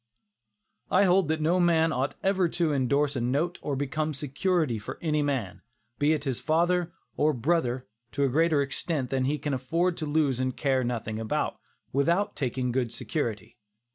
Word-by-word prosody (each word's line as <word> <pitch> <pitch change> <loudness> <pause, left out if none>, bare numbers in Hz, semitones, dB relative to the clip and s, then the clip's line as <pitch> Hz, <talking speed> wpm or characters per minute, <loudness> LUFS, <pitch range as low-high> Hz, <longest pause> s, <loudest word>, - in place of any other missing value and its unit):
I 190 - +4
hold 185 -2 +4
that 160 0 0
no 170 +4 +2
man 165 -2 +3
ought 135 -1 -1
ever 190 -2 +2
to 165 -2 0
indorse 140 +2 +1
a 125 - -1
note 145 +9 0
or 145 - -2
become 150 +3 -2
security 145 - 0
for 100 - -7
any 150 -2 0
man, 135 -10 -2 0.4
be 145 +2 +4
it 155 - -2
his 135 -5 -2
father 175 +2 +1 0.3
or 150 +1 +3
brother, 130 -1 0 0.3
to 140 - 0
a - - +4
greater 155 +1 +3
extent 140 -1 -3
than 130 -1 +1
he 145 +3 0
can 145 -1 -3
afford 165 +8 0
to 155 - -3
lose 145 -4 +1
and 130 -1 -1
care 135 -3 +1
nothing 115 -3 -3
about, 110 -1 -2 0.3
without 170 +10 +1
taking 130 -2 -1
good 120 -2 -1
security. 115 -3 -4
145 Hz, 175 wpm, -27 LUFS, 130-165 Hz, 0.4 s, I